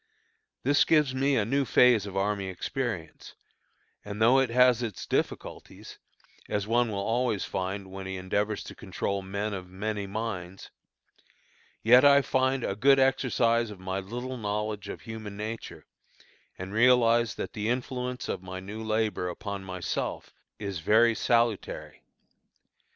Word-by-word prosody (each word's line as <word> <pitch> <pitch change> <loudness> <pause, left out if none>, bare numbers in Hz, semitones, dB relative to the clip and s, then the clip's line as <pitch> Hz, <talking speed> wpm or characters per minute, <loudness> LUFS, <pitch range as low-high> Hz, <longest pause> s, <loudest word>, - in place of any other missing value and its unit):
This 145 +3 +4
gives 150 -5 +3
me 135 +1 +1
a 105 - +2
new 140 +5 +1
phase 120 -5 +4
of 95 -1 -6
army 100 0 0
experience, 95 -1 -5 0.7
and 105 0 -7
though 120 +4 +5
it 135 -2 +2
has 125 0 +4
its 115 -5 -4
difficulties, - - -4 0.5
as 105 -1 -1
one 120 +2 +2
will 105 - -3
always 115 +1 0
find 95 0 -4
when 95 0 -7
he 95 0 -4
endeavors 100 +3 -1
to - - -9
control 100 0 -3
"men 100 +2 -3
of 90 -2 -6
many 100 +2 -3
minds," 95 -3 -5 1.1
yet 125 +4 +7
I 140 0 +7
find 130 -1 +1
a 100 - -1
good 135 +6 +5
exercise 120 -3 +2
of 105 -3 -10
my 95 +1 -3
little 125 +6 -5
knowledge 105 -1 -3
of - - -7
human 110 -3 -8
nature, 110 +2 -6 0.7
and 95 +2 -7
realize 120 -1 +4
that - - -5
the 105 0 -2
influence 125 0 -3
of - - -3
my 95 0 -7
new 105 +4 -7
labor 110 -4 -1
upon 100 +2 -6
myself 90 -2 -4 0.2
is 100 -4 -4
very 115 +7 +4
salutary. 115 -2 0
110 Hz, 145 wpm, -28 LUFS, 100-125 Hz, 1.1 s, yet